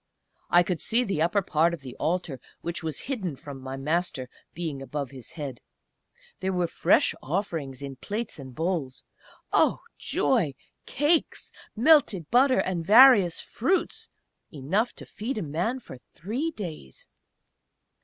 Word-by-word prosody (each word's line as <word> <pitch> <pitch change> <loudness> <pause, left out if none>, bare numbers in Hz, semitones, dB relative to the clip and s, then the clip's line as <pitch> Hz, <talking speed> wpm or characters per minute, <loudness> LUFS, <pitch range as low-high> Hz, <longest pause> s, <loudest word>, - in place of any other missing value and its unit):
I 175 0 +6
could 175 -2 -2
see 240 +3 +2
the 195 -9 -1
upper 180 +5 +2
part 170 +1 +2
of 160 - -17
the 130 -2 -9
altar 165 -5 -1 0.2
which 170 +1 -4
was 160 -3 -3
hidden 200 - -3
from 135 0 -10
my 130 0 -6
Master, 150 -2 -1 0.2
being 160 -5 -5
above 140 -1 -4
his 130 -3 -11
head. 140 -6 -6 0.8
There 190 - -1
were 180 -1 +1
fresh 165 - +3
offerings 150 -5 -3
in 135 -1 -7
plates 210 - -4
and 130 -2 -10
bowls 160 -6 -2 0.5
Oh! - - +3 0.2
joy! 180 - +1 0.3
Cakes, 295 +4 0 0.2
melted 230 - +4
butter, 260 +2 +5
and 180 -3 -2
various 210 -3 +7
fruits 360 +11 -1 0.4
enough 175 - 0
to - - -9
feed 235 +5 -5
a 210 - -2
man 175 - -1
for 130 - -11 0.2
three 235 - -2
days! 170 - -8
170 Hz, 145 wpm, -27 LUFS, 140-215 Hz, 0.8 s, various